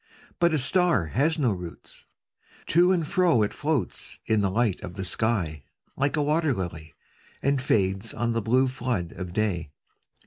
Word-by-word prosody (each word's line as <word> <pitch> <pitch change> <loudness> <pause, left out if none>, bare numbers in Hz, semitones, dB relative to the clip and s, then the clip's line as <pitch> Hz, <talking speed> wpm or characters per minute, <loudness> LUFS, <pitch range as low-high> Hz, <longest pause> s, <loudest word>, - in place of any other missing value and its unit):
'But 170 -1 +4
a 155 - +2
star 150 - +2
has 155 - +1
no 130 -7 +2
roots: 90 -3 -8 0.6
to 175 +3 +4
and 170 -4 +1
fro 180 - +3
It 105 - -2
floats 150 -3 -2
in 110 -1 +2
the 100 - +1
light 105 -1 0
of 90 - -7
the 95 -1 -4
sky, 90 -8 -1 0.3
like 140 +3 0
a 150 - +2
wat«r 155 +2 +1
]ily. 80 -4 -6 0.5
And 140 -1 +2
fades 95 -3 0
on 120 -1 -1
the 115 - 0
blue 125 +5 +3
flood 120 -9 -2
of 90 -2 -7
day. 90 -6 -1
115 Hz, 170 wpm, -26 LUFS, 95-150 Hz, 0.6 s, But